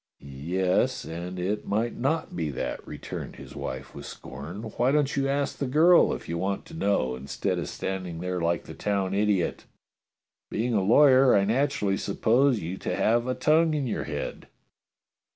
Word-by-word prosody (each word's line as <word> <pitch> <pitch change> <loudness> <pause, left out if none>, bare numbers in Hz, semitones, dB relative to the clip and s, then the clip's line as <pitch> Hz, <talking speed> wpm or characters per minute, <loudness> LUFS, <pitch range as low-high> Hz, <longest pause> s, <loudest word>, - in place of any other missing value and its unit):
"Yes, 85 +7 -1
and 85 +3 -6
it 95 +4 -2
might 110 +4 0
not 140 - -1
be 80 -3 -1
that," 70 - -4
returned - - -7
his - - -11
wife 65 0 -6
with - - -8
scorn. 75 - -8
"Why 120 +3 0
don't 145 -1 +1
you 135 0 +1
ask 140 0 0
the 140 - -1
girl 165 +6 +5
if - - -5
you 85 +1 -3
want 95 +2 -2
to - - -13
know, 100 - 0
instead 65 +2 -2
of - - -4
standing 95 -3 -4
there 90 0 -2
like 85 -1 0
the - - -10
town 100 -2 -1
idiot? 100 -3 0 0.8
Being 120 +3 -1
a 105 - +3
lawyer, 130 +5 +6
I 100 -1 +4
naturally 110 -4 +1
suppose 125 +1 +2
you 90 +4 -4
to - - -2
have 120 +2 +2
a 130 - 0
tongue 160 +1 +3
in 145 -3 -1
your 120 - -2
head." 75 -2 -5
100 Hz, 175 wpm, -27 LUFS, 90-130 Hz, 0.8 s, lawyer